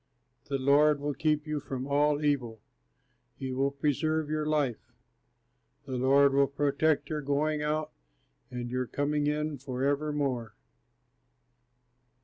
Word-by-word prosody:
The 140 - -2
Lord 145 +2 +4
will 145 +1 -2
keep 150 0 0
you 150 -1 -2
from 135 -2 -5
all 145 +1 +2
evil; 125 -6 0 0.8
he 130 -1 -5
will 135 +2 +1
preserve 150 +2 -1
your 155 -1 -1
life; 145 -6 -1 0.9
The 130 -2 -4
Lord 135 +2 +4
will 140 0 +4
protect 145 +1 +1
your 155 -1 -1
going 150 +2 0
out 150 +1 -1 0.6
and 120 -1 -5
your 125 0 -1
coming 145 +2 -1
in 150 -1 -1
forevermore! 135 -3 -1
145 Hz, 125 wpm, -29 LUFS, 135-150 Hz, 0.9 s, Lord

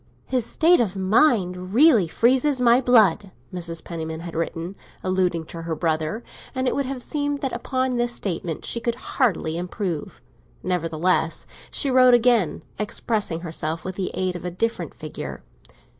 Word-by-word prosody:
"His 250 -3 0
state 340 +2 +4
of 200 -5 0
mind 190 -3 +2
really 250 - +6
freezes 255 - +2
my 245 +1 +5
blood," 215 -6 +4 0.2
Mrs. 170 -2 -4
Penniman 160 -1 -5
had 170 -1 -7
written, 165 +2 -3 0.3
alluding 180 -3 0
to 165 +1 -8
her 165 -1 -3
brother; 160 +7 -1 0.3
and 260 0 0
it - - +2
would 280 -2 -1
have 260 -2 -5
seemed 290 -1 -2
that 270 - -2
upon 255 +1 -1
this 240 0 +1
statement 175 -7 -3
she 235 - 0
could 235 0 -1
hardly 185 - 0
improve. 180 -3 -4 0.4
Nevertheless, 165 -1 0 0.2
she 275 - 0
wrote 255 -1 +7
again, 235 -7 +2 0.2
expressing 210 -5 -1
herself 160 -1 -4
with 185 - -3
the 185 0 -2
aid 185 -1 -1
of 175 - -6
a 180 - -2
different 225 +6 -2
figure. - - -7
195 Hz, 160 wpm, -23 LUFS, 170-245 Hz, 0.4 s, wrote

